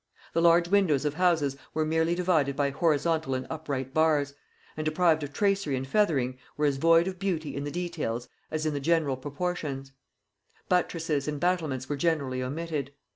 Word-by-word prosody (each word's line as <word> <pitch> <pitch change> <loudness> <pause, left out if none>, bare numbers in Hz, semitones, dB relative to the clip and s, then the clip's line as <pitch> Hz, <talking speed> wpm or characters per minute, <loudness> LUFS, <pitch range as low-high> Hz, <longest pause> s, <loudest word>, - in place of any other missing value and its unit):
The 165 - +2
large 170 0 +5
windows 175 -7 +3
of 145 - 0
houses 160 -5 +2 0.2
were 155 0 +1
merely 160 +2 +1
divided 165 -6 +1
by 140 0 +1
horizontal 155 -1 +1
and 130 0 -3
upright 140 -5 -4
bars, 150 -3 +2 0.4
and, 155 - -3
deprived 155 +1 +2
of 145 -1 -5
tracery 195 -5 +1
and 130 +1 -3
feathering, 135 -8 +1 0.2
were 150 - +1
as 140 -2 +1
void 165 +4 +5
of 185 -1 -5
beauty 160 -7 -2
in 140 - -3
the - - -3
details 140 -8 -3 0.2
as 155 0 -2
in 155 - 0
the 145 - -2
general 155 -2 +1
proportions; 140 -1 -4 0.8
buttresses 165 -5 0
and 150 -1 -2
battlements 155 -7 0
were 145 - -2
generally 140 -5 0
omitted. 145 +1 -3
155 Hz, 175 wpm, -28 LUFS, 140-170 Hz, 0.8 s, large